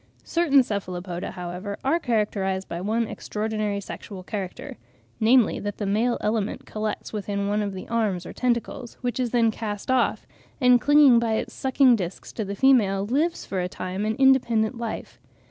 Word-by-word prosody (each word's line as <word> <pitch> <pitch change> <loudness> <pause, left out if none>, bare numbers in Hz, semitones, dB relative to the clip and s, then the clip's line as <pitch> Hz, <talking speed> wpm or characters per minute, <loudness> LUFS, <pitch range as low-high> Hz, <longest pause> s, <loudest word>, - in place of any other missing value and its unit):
Certain 295 -6 +3
Cephalopoda, 185 -4 -4
however, 180 +3 -5
are 315 +6 +2
characterised 205 - -1
by 170 - -5
one 220 +4 0
extraordinary 215 -1 -3
sexual 195 -1 -8
character, 195 -2 -6 0.4
namely 230 +1 +4
that 205 0 -4
the 210 - -3
male 220 +5 +1
element 210 -1 -1
collects 215 +1 -4
within 200 -1 -2
one 210 +1 +1
of 200 -2 -3
the 185 - -7
arms 210 -6 -1
or - - -8
tentacles, 240 0 -2
which 245 -1 -2
is 250 -2 0
then 230 -1 +3
cast 210 +1 -4
off, 255 -2 +1 0.3
and 250 -3 +5
clinging 290 -4 +6
by 230 -1 0
its - - -3
sucking 265 -1 +4
discs 180 -4 -6
to 220 - -3
the 200 0 -5
female, 200 -6 +3
lives 300 +10 0
for 190 - -3
a 180 - -2
time 185 +2 -4
an 220 +1 0
independent 245 -4 +3
life. 235 -1 -6
215 Hz, 170 wpm, -25 LUFS, 200-245 Hz, 0.4 s, clinging